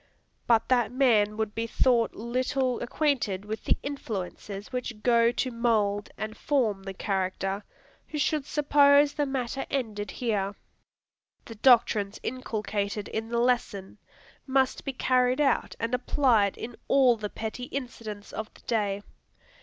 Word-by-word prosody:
But 230 Hz, -2 st, +4 dB
that 240 Hz, -4 st, +3 dB
man 220 Hz, -5 st, +3 dB
would 220 Hz, -1 st, -2 dB
be 230 Hz, 0 st, -2 dB
thought 235 Hz, 0 st, +2 dB
little 255 Hz, +2 st, -1 dB
acquainted 240 Hz, -9 st, 0 dB
with 220 Hz, +1 st, -5 dB
the -, -, +2 dB
influences 205 Hz, -6 st, -5 dB
which 240 Hz, -4 st, -4 dB
go 235 Hz, -1 st, +4 dB
to 255 Hz, -, -1 dB
mould 215 Hz, -4 st, +1 dB
and 215 Hz, 0 st, -5 dB
form 230 Hz, -9 st, 0 dB
the 195 Hz, 0 st, -6 dB
character, 195 Hz, +1 st, -2 dB, 0.4 s
who 305 Hz, -, -5 dB
should 295 Hz, -1 st, 0 dB
suppose 285 Hz, -1 st, +4 dB
the 290 Hz, -2 st, -1 dB
matter 270 Hz, 0 st, -2 dB
ended 215 Hz, -6 st, -2 dB
here. 205 Hz, -5 st, -2 dB, 0.9 s
The 230 Hz, -, -8 dB
doctrines 220 Hz, -3 st, +3 dB
inculcated 210 Hz, -4 st, -3 dB
in 220 Hz, +1 st, -4 dB
the 235 Hz, -, -1 dB
lesson, 235 Hz, -5 st, 0 dB, 0.5 s
must 265 Hz, -1 st, +1 dB
be 275 Hz, -, -2 dB
carried 255 Hz, 0 st, +2 dB
out 275 Hz, -4 st, +1 dB
and 230 Hz, +1 st, -2 dB
applied 245 Hz, -5 st, +2 dB
in 235 Hz, +1 st, -7 dB
all 260 Hz, -3 st, +5 dB
the 215 Hz, -2 st, -5 dB
petty 225 Hz, +4 st, -5 dB
incidents 230 Hz, -6 st, -7 dB
of 220 Hz, 0 st, -5 dB
the -, -, -17 dB
day. 205 Hz, -4 st, -1 dB
230 Hz, 140 wpm, -27 LUFS, 210-255 Hz, 0.9 s, all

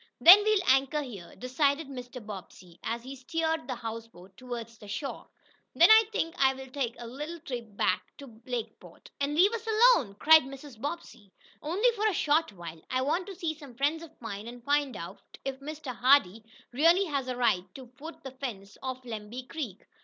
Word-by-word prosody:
"Then 375 Hz, +5 st, +10 dB
we'll 425 Hz, -2 st, +3 dB
anchor 270 Hz, +3 st, +3 dB
here," 200 Hz, -10 st, -10 dB
decided 280 Hz, +4 st, 0 dB
Mr. 250 Hz, -3 st, -8 dB
Bobbsey, 185 Hz, -4 st, -10 dB
as 230 Hz, +1 st, -3 dB
he 265 Hz, +2 st, -8 dB
steered 320 Hz, +4 st, -2 dB
the 255 Hz, -, -3 dB
houseboat 225 Hz, -5 st, -8 dB
toward 240 Hz, -1 st, -6 dB, 0.2 s
shore. 275 Hz, +7 st, -5 dB, 0.5 s
"Then -, -, +7 dB
I 440 Hz, 0 st, +8 dB
think 330 Hz, -5 st, -1 dB
I'll 265 Hz, 0 st, +2 dB
take 255 Hz, -4 st, -2 dB
a 240 Hz, -, -8 dB
little 300 Hz, +8 st, -6 dB
trip 240 Hz, -, -7 dB
back -, -, +2 dB, 0.2 s
to 235 Hz, -6 st, -13 dB
Lakeport." 245 Hz, -3 st, -7 dB
"And 285 Hz, +1 st, -1 dB
leave 385 Hz, +7 st, +5 dB
us 455 Hz, 0 st, -5 dB
alone?" 435 Hz, -, +4 dB
cried 315 Hz, +8 st, +7 dB
Mrs. 270 Hz, -3 st, -11 dB
Bobbsey. 280 Hz, -, -6 dB, 0.3 s
"Only 390 Hz, +11 st, +2 dB
for 430 Hz, 0 st, +1 dB
a 425 Hz, -, +1 dB
short 315 Hz, -1 st, +2 dB
while. 170 Hz, -4 st, -9 dB
I 255 Hz, 0 st, 0 dB
want 340 Hz, +7 st, 0 dB
to 395 Hz, -, -7 dB
see 335 Hz, -3 st, -2 dB
some 285 Hz, -6 st, -13 dB
friends 290 Hz, +5 st, 0 dB
of 325 Hz, -1 st, -13 dB
mine, 215 Hz, -2 st, -6 dB
and 240 Hz, 0 st, -10 dB
find 285 Hz, 0 st, +1 dB
out 170 Hz, +3 st, -8 dB, 0.2 s
if 270 Hz, -1 st, -3 dB
Mr. 285 Hz, -2 st, -6 dB
Hardee 235 Hz, -5 st, +4 dB, 0.3 s
really 335 Hz, +9 st, +4 dB
has 280 Hz, -6 st, -2 dB
the 250 Hz, -1 st, -3 dB
right 200 Hz, -7 st, +2 dB
to 255 Hz, -3 st, -11 dB, 0.5 s
fence 200 Hz, -7 st, -6 dB
off 260 Hz, -1 st, -5 dB
Lemby 225 Hz, +2 st, -6 dB
Creek. 250 Hz, -, -6 dB
265 Hz, 180 wpm, -29 LUFS, 230-315 Hz, 0.5 s, Then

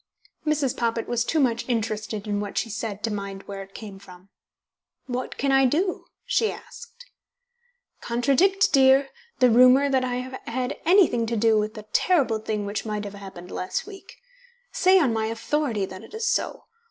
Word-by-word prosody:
Mrs. 290 Hz, -4 st, +1 dB
Poppit 230 Hz, -1 st, -1 dB
was 240 Hz, -1 st, 0 dB
too 315 Hz, +6 st, 0 dB
much 240 Hz, -3 st, 0 dB
interested 220 Hz, -2 st, -2 dB
in 205 Hz, -1 st, -1 dB
what 205 Hz, -1 st, -5 dB
she 230 Hz, -, -1 dB
said 210 Hz, -1 st, -5 dB
to 225 Hz, -, -1 dB
mind 200 Hz, -1 st, -6 dB
where 195 Hz, -1 st, -7 dB
it 195 Hz, 0 st, -13 dB
came 205 Hz, -3 st, -9 dB
from. 185 Hz, -1 st, -15 dB, 0.8 s
"What 250 Hz, 0 st, -4 dB
can 275 Hz, 0 st, 0 dB
I 270 Hz, -1 st, +5 dB
do?" 355 Hz, +8 st, -1 dB, 0.2 s
she 480 Hz, -3 st, +1 dB
asked. 475 Hz, +1 st, -12 dB, 1.0 s
"Contradict, 350 Hz, -, +2 dB
dear, 270 Hz, 0 st, +5 dB, 0.3 s
the 250 Hz, -2 st, +4 dB
rumour 255 Hz, +4 st, +6 dB
that 265 Hz, -1 st, +2 dB
I 250 Hz, -1 st, -2 dB
have 255 Hz, +1 st, -5 dB
had 250 Hz, +3 st, -3 dB
anything 330 Hz, -, +4 dB
to 230 Hz, 0 st, -1 dB
do 225 Hz, +1 st, +3 dB
with 215 Hz, +1 st, -3 dB
the 215 Hz, -1 st, -9 dB
terrible 275 Hz, -12 st, +2 dB
thing 215 Hz, -1 st, -3 dB
which 205 Hz, +1 st, -3 dB
might 210 Hz, -1 st, -3 dB
have 205 Hz, -1 st, -7 dB
happened 190 Hz, -3 st, -10 dB
last 185 Hz, -, -3 dB
week. 395 Hz, -1 st, -12 dB, 0.6 s
Say 380 Hz, -6 st, +4 dB
on 280 Hz, -10 st, +3 dB
my 220 Hz, 0 st, -1 dB
authority 230 Hz, -1 st, -1 dB
that 185 Hz, 0 st, -10 dB
it -, -, -12 dB
is 445 Hz, +1 st, -2 dB
so. -, -, -1 dB
235 Hz, 180 wpm, -24 LUFS, 210-280 Hz, 1.0 s, rumour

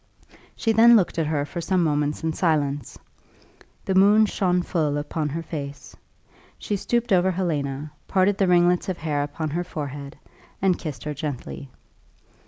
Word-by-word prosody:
She 225 Hz, -, 0 dB
then 230 Hz, +2 st, +7 dB
looked 185 Hz, -5 st, +2 dB
at 160 Hz, -, 0 dB
her 150 Hz, -2 st, 0 dB
for 170 Hz, +4 st, -6 dB
some 185 Hz, +1 st, +1 dB
moments 150 Hz, -1 st, 0 dB
in 160 Hz, 0 st, 0 dB
silence. 145 Hz, -6 st, -1 dB, 0.9 s
The 190 Hz, -, 0 dB
moon 205 Hz, +3 st, +6 dB
shone 180 Hz, -3 st, 0 dB
full 155 Hz, -5 st, 0 dB
upon 150 Hz, +1 st, -2 dB
her 165 Hz, +3 st, -4 dB
face. 145 Hz, -3 st, -7 dB, 0.6 s
She 205 Hz, -, -3 dB
stooped 235 Hz, +2 st, 0 dB
over 185 Hz, 0 st, +4 dB
Helena, 150 Hz, -6 st, -2 dB, 0.2 s
parted 190 Hz, +1 st, +2 dB
the 195 Hz, -, +3 dB
ringlets 175 Hz, +1 st, +3 dB
of 185 Hz, -, -2 dB
hair 150 Hz, -3 st, -1 dB
upon 145 Hz, +2 st, -4 dB
her 175 Hz, +3 st, -1 dB
forehead, 145 Hz, -4 st, -7 dB, 0.4 s
and 185 Hz, -2 st, +2 dB
kissed 145 Hz, -8 st, -6 dB
her 150 Hz, -, -3 dB
gently. 140 Hz, -1 st, -6 dB
165 Hz, 160 wpm, -24 LUFS, 145-185 Hz, 0.9 s, then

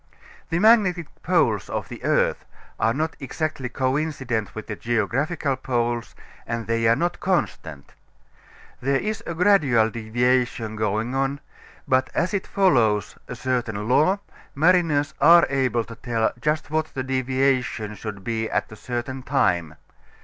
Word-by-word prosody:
The 165 Hz, -, 0 dB
magnetic 195 Hz, -4 st, +4 dB, 0.2 s
poles 150 Hz, -, +1 dB
of -, -, -3 dB
the -, -, -10 dB
earth -, -, +1 dB, 0.4 s
are 110 Hz, -, +3 dB
not 155 Hz, +6 st, -2 dB
exactly 140 Hz, -1 st, -3 dB
coincident 130 Hz, -4 st, -2 dB
with 110 Hz, -, -6 dB
the 110 Hz, -, -5 dB
geographical 130 Hz, -, -1 dB
poles, 120 Hz, -2 st, -2 dB, 0.3 s
and 115 Hz, -1 st, -3 dB
they 115 Hz, 0 st, +1 dB
are 115 Hz, -, +5 dB
not 175 Hz, +4 st, -1 dB
constant. 80 Hz, -, -2 dB, 0.9 s
There 135 Hz, +1 st, +1 dB
is 215 Hz, +1 st, -3 dB
a 170 Hz, -, -3 dB
gradual 150 Hz, -, +4 dB
deviation 120 Hz, 0 st, 0 dB
going 110 Hz, +3 st, -1 dB
on, 135 Hz, +1 st, -1 dB, 0.5 s
but 130 Hz, 0 st, +2 dB
as 175 Hz, +5 st, 0 dB
it 200 Hz, -, -2 dB
follows 120 Hz, -, +2 dB
a -, -, -6 dB
certain 115 Hz, -5 st, -2 dB
law 155 Hz, -, +3 dB, 0.4 s
mariners 160 Hz, -2 st, +3 dB
are 170 Hz, +1 st, +8 dB
able 130 Hz, -3 st, +1 dB
to 115 Hz, -, -10 dB
tell 115 Hz, -1 st, -1 dB
just 150 Hz, 0 st, -1 dB
what 155 Hz, 0 st, 0 dB
the 130 Hz, -, -2 dB
deviation 130 Hz, -4 st, 0 dB
should 105 Hz, -2 st, -7 dB
be 110 Hz, +1 st, -2 dB
at -, -, -1 dB
a -, -, -8 dB
certain 120 Hz, +4 st, -5 dB
time. 90 Hz, -, 0 dB
130 Hz, 140 wpm, -23 LUFS, 115-155 Hz, 0.9 s, are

